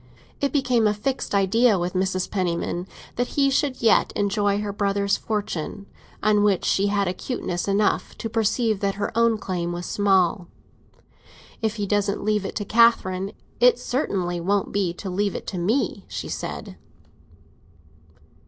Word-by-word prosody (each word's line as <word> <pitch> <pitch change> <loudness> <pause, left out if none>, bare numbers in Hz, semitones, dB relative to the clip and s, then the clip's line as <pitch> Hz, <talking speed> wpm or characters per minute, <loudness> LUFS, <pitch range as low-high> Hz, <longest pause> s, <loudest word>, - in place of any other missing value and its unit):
It 280 - 0
became 250 -6 +2
a 210 - +1
fixed 255 0 -2
idea 205 +3 +4
with 175 0 -2
Mrs. 185 0 0
Penniman 175 -1 -2 0.3
that 245 +3 -2
he 275 -1 +4
should 270 -2 0
yet 225 - +4
enjoy 205 0 +1
her 205 -1 -3
brother's 200 -1 +1
fortune, 205 -2 -4 0.4
on 210 -1 +4
which 200 -3 +2
she 200 +1 +2
had 200 -1 +1
acuteness 180 -1 -3
enough 200 +1 +1
to 225 - -4
perceive 225 -1 +1
that 200 -1 -1
her 205 +2 -3
own 230 -1 +3
claim 175 -4 -3
was 175 0 -5
small. 190 -3 +2 1.1
"If 220 -1 0
he 205 -2 -2
doesn't 205 0 0
leave 210 -1 +1
it - - -5
to 205 - -2
Catherine, 200 -4 +3 0.3
it 245 +1 +6
certainly 190 - -2
won't 195 +3 0
be 195 -4 0
to 195 - -7
leave 200 +2 -1
it - - -5
to 185 - -4
me," 220 +11 0
she - - -5
said. - - -5
205 Hz, 155 wpm, -24 LUFS, 190-225 Hz, 1.1 s, it